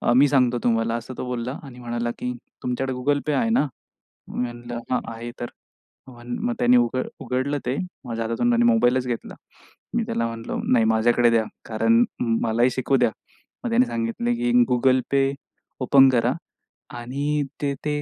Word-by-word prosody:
मी 140 +3 +6
सांगतो 125 -3 +3
तुम्हाला 115 -1 +1
असं 120 +2 -6
तो - - -4
बोलला 125 0 -3
आणि 125 -3 -11
म्हणाला 120 0 -2
की 125 - -2 0.3
तुमच्याकडे 130 +1 -1
Google 145 +3 +1
Pay 150 - +2
आहे 230 - +1
ना? 225 -9 +3 0.6
मी - - -4
म्हंटलं 120 0 -5
हां, 125 - +2
आहे. 120 +1 -6
तर 120 - -4 0.6
मग 120 -1 -4
त्यांनी 125 +1 +5
उघड 120 +1 +1
उघडलं 130 +3 -1
ते 125 +3 0 0.3
माझ्या 115 -2 -3
हातातून 115 - 0
त्याने 240 0 +3
मोबाईलच 130 - +3
घेतला. 120 -2 -4 0.6
मी - - +2
त्याला 115 0 -1
म्हंटलं 115 0 -4
नाही 115 -3 +5
माझ्याकडे 120 +2 +4
द्या 115 -1 +3 0.2
कारण 115 +1 +3 0.4
मलाही 115 +2 +2
शिकू 130 +2 +1
द्या. 115 - +3 0.5
मग 240 - -1
त्याने 245 +2 +4
सांगितले 115 - -1
की 120 +1 0 0.2
Google 130 +1 +4
Pay 135 0 +3 0.5
ओपन 135 +1 +6
करा 120 0 +2 0.7
आणि 145 +4 -1 0.2
ते 140 -1 0
ते 150 0 0
125 Hz, 165 wpm, -24 LUFS, 120-135 Hz, 0.7 s, मी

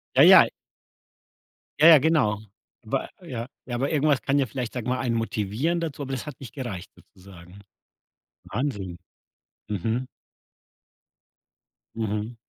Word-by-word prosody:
Ja, - - +6
ja. - - +9 1.3
Ja, 155 - +8
ja, 165 -2 +10
genau. 130 -10 +2 0.5
Wei - - -2
ja, 120 -1 -6 0.2
ja, 120 - -4
aber 135 +5 -1
irgendwas 145 -2 +2
kann 140 - +1
ja 140 - +3
vielleicht, 125 0 -5
sage 125 -3 -4
ich - - -2
mal, 130 - 0
einen 120 -4 -1
motivieren 115 - -1
dazu, 160 -4 -4
aber 135 -1 -5
das 130 -3 -4
hat 145 - -8
nicht 135 - -10
gereicht 115 -10 -6
sozusagen? 95 0 -16 0.9
Wahnsinn. 100 -8 -3 0.7
Mhm. 110 +5 -2 1.9
Mhm. 110 +1 -3
120 Hz, 135 wpm, -25 LUFS, 105-140 Hz, 1.9 s, ja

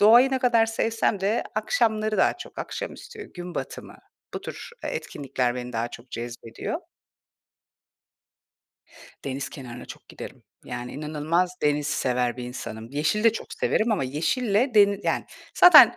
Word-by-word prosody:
doğayı 235 +6 +8
ne 265 - +1
kadar 235 -3 +4
sevsem 225 -2 0
de 210 +4 +1
akşamları, 215 0 +1
daha 190 - +3
çok - - -10
akşamüstü, 430 -2 -6
gün 175 -1 -7
batımı... - - -6 0.4
Bu - - -3
tür, - - -7
eee, - - -1
etkinlikler 125 -3 -2
beni 125 0 -5
daha 115 0 -1
çok 120 +1 -12
cezbediyor. 115 -1 -5 2.4
Deniz 135 0 -3
kenarına 125 -3 -8
çok - - -11
giderim. - - -9 0.2
Yani, 125 0 -5
inanılmaz 155 +4 0
deniz 150 0 +2
sever 125 -5 +1
bir 125 - -5
insanım. 115 -2 -6
Yeşili 155 +10 +1
de 230 - +7
çok - - -6
severim 220 +1 +1
ama 180 -10 +1
yeşille 205 - +1
deni 200 -1 +6
yani, - - 0 0.3
zaten 360 - +10
165 Hz, 145 wpm, -26 LUFS, -, 2.4 s, zaten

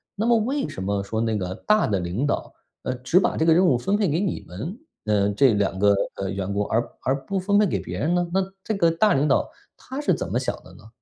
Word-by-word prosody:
那 210 - -1
么 235 0 +4
为 270 +6 -1
什 - - -7
么 100 +1 -1
说 110 +3 -3
那 110 -1 0
个 90 -2 -3
大 215 0 +4
的 100 -2 0
领 90 +11 -2
导， - - -2 0.3
呃， 130 - -1
只 125 +8 +2
把 - - 0
这 160 - +2
个 - - +6
任 180 +3 +4
务 165 - +4
分 195 +12 0
配 210 -2 +1
给 155 +3 +1
你 195 -3 -2
们， 130 - -6 0.3
呃， 105 -2 +2
这 125 +4 +4
两 95 -2 0
个， 100 0 +5 0.2
呃， 95 -1 -3
员 95 0 -3
工， 100 +1 0
而 115 - +2 0.2
而 135 0 -1
不 195 +5 -1
分 200 +2 +2
配 210 - +5
给 190 - -1
别 - - -6
人 165 +4 +1
呢？ 175 -1 0
那 190 - +3 0.2
这 220 - -2
个 170 -4 +3
大 205 +6 +3
领 140 +2 +2
导 - - +2 0.3
他 265 +2 -7
是 295 - +2
怎 - - -3
么 - - +1
想 - - -2
的 - - -15
呢？ - - -16
140 Hz, 290 characters per minute, -24 LUFS, -, 0.3 s, 个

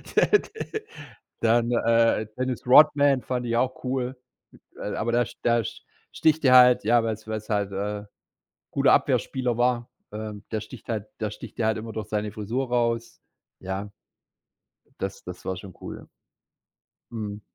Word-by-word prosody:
Der 420 - +5
de 435 0 -7 0.6
dann, 115 +1 +3
äh, 115 -2 +3
Dennis 130 -1 -2
Rodman 145 -1 +6
fand 125 -1 -3
ich 115 0 -1
auch 130 +1 0
cool, 130 0 -2 0.6
aber 115 +2 -2
der 120 -1 +2 0.2
der 120 -1 +3
sch - - -7 0.3
sticht 160 -1 +2
dir 130 -1 +6
halt 125 -1 +7
ja, 120 -1 +4
weil's 110 -1 -4
weil's 110 0 -5
halt, 100 -2 0
äh, - - -6 0.3
'n 105 - -15 0.6
guter - - +4
Abwehrspieler 125 -3 +1
war. 120 -1 +1 0.2
Ähm, 105 -1 -6
der 110 - -1
sticht 110 +2 -11
halt 110 -2 -2
der 105 -1 -2
sticht 110 +1 -10
dir 110 - 0
halt 110 - +1
immer 110 +1 -6
durch 110 -1 -5
seine 105 -1 -2
Frisur 115 +5 -3
raus, 115 -1 0 0.4
ja 95 +2 -5 1.1
Das 95 0 -4
das 90 -1 -9
war 95 - -2
schon 95 -1 -10
cool, - - -6
ja. - - -14 1.0
Mhm. 105 -2 -5
115 Hz, 160 wpm, -25 LUFS, 105-125 Hz, 1.1 s, halt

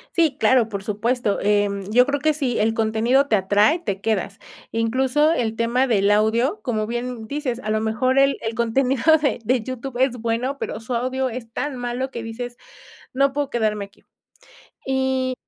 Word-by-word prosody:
Sí, 320 -6 +2
claro, 250 -4 +4
por 200 -3 -5
supuesto, 215 +1 -1
em, 205 -1 +1
yo 250 +2 +6
creo 285 +2 -1
que 310 +2 +1
sí, 270 -5 -1
el 220 +1 +1
contenido 225 +5 +2
te 220 - +4
atrae, 205 - +3
te 200 - -4
quedas. 200 -2 -2 0.3
Incluso 260 +7 +2
el 230 -8 -1
tema 235 +3 +1
del 205 -5 +2
audio, 225 - +2
como 215 -5 -2
bien, 240 +2 -3
mm, - - -9
dices, 270 -4 -3
a 215 - -3
lo 215 0 +1
mejor 240 +5 +1
el 275 0 +4
el 225 0 -3
contenido 250 +2 0 0.2
de 285 - +1
de 245 +1 +1
YouTube 255 +1 -6
es 260 -1 +2
bueno, 235 +4 -2
pero 220 - -4
su 245 +2 -5
audio 255 +2 -1
es 230 -1 -8
tan 290 +2 -3
malo 245 +2 -3
que 235 -3 -6
dices: 240 +2 -6 0.6
"No 275 +1 +2
puedo 285 0 -2
quedarme 215 -4 -1
aquí". 200 - -27 0.8
Y, 265 -1 0
240 Hz, 185 wpm, -22 LUFS, 220-265 Hz, 0.8 s, yo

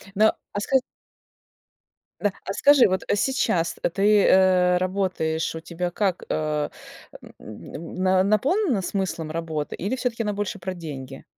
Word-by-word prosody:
Но, 215 +2 +5 0.2
а, 205 - -2
ска 265 +6 +1 1.4
Да. 205 -2 +1
А - - -3
скажи, 285 +4 +6
вот 185 0 -1
сейчас 205 -8 0 0.2
ты, 205 +1 +4
э, 185 -1 +4
работаешь, 180 -4 -1
у 160 - -5
тебя 175 +2 -4
как, 190 0 -1
а, 150 -1 -1 0.5
мн 165 - -10
мн 185 +1 +3
наполнена 270 - +2
смыслом 180 -5 -3
работа 160 -2 -4
или 205 +8 -2
всё-таки 240 -2 -2
она 210 -2 -1
больше 205 +1 -3
про 185 0 -5
деньги? 135 -6 -8
185 Hz, 135 wpm, -24 LUFS, 165-210 Hz, 1.4 s, скажи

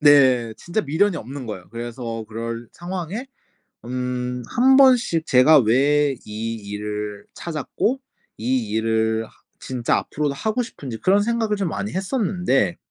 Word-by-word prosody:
네. 130 -6 +5
진짜 175 +5 -2
미련이 175 +5 +1
없는 130 +1 -7
거예요. 95 -5 -7
그래서 115 -1 -5
그럴 115 +1 -5
상황에 180 +6 -5 0.6
음 125 0 -3
1 265 +2 +5
번씩 245 -12 +5
제가 140 +4 +7
'왜 140 +4 +3
이 110 +2 -4
일을 105 0 -5
찾았고 170 - -2 0.4
이 120 -1 0
일을 110 0 +1
하 - - -19 0.3
진짜 125 -3 0
앞으로도 145 -2 -2
하고 220 - -1
싶은지.' 135 - -7
그런 200 +2 +3
생각을 225 -2 0
좀 195 -4 -1
많이 205 +6 -4
했었는데 185 - 0
130 Hz, 270 characters per minute, -22 LUFS, 115-185 Hz, 0.6 s, 제가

